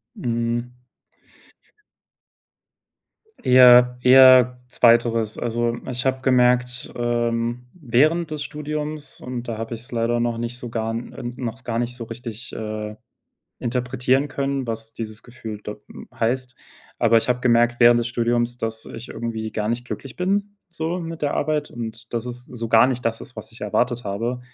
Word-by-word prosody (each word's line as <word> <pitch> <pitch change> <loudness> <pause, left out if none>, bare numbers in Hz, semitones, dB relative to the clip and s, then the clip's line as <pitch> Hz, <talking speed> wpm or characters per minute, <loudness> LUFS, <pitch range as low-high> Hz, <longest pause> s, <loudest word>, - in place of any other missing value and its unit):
Mhm. 120 0 -2 2.7
Eher 125 -1 +7
eher 125 -1 +7
2. 115 -3 +3
Also, 120 0 -1
ich 125 +1 -3
habe 130 0 +1
gemerkt, 125 -1 +2
ähm, 120 0 -1
während 155 +2 +2
des 150 -1 -3
Studiums 150 -1 -5
und 125 -1 -6
da 115 -2 -3
habe 115 +1 -5
ich's 120 +4 -11
leider 120 0 0
noch 120 -1 0
nicht 120 +1 -4
so 120 - -6
gar 115 -1 -2
n 115 +1 -5
äh, 135 - -8 0.2
noch 115 -2 -3
s 130 - -17
gar 115 -1 -2
nicht 120 0 -2
so 120 - -6
richtig, 115 +1 -8
äh, 110 -1 -5 0.7
interpretieren 125 +3 0
können, 135 -1 -2
was 115 0 -4
dieses 110 -1 -6
Gefühl 110 -3 -8
da 105 - -5
m - - -11
heißt. 125 +2 -1 0.4
Aber 115 -1 +5
ich 115 - 0
habe 125 0 0
gemerkt 120 -1 +3
während 120 0 +7
des 120 - -1
Studiums, 120 0 0
dass 110 -1 -2
ich 115 +3 -9
irgendwie 110 -2 -4
gar 105 -1 -2
nicht 120 +2 -1
glücklich 130 +1 -7
bin, 200 +3 -1 0.2
so 165 +1 -3
mit 165 -1 -6
der 145 - 0
Arbeit. 150 0 -1
Und 115 0 -8
dass 120 +1 -2
es 125 0 -6
so 115 -2 -6
gar 115 +3 +6
nicht 125 -2 -2
das 115 0 0
ist, - - -12
was 110 +1 -8
ich 115 - -15
erwartet 120 +3 0
habe, 115 +5 -2
120 Hz, 165 wpm, -22 LUFS, 115-130 Hz, 2.7 s, Eher